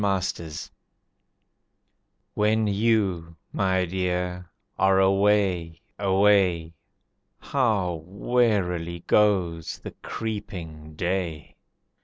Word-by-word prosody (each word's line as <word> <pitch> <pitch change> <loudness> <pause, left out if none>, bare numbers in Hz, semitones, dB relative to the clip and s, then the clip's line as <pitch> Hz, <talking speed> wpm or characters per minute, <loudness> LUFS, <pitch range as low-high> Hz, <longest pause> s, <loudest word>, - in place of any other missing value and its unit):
A - - -1
Little 95 -4 -1
Song 75 - -7 1.6
When 110 +1 +2
you, 100 -6 0 0.2
my 95 -1 +1
Dear, 90 0 -2 0.3
are 95 0 +4
away, 95 -4 +2 0.2
away, 95 -4 +3 0.6
How 100 - 0
wearily 90 -5 0
goes 90 -6 +1
the - - -9
creeping 85 -8 -6
day. 85 -3 -3
95 Hz, 80 wpm, -25 LUFS, 85-105 Hz, 1.6 s, are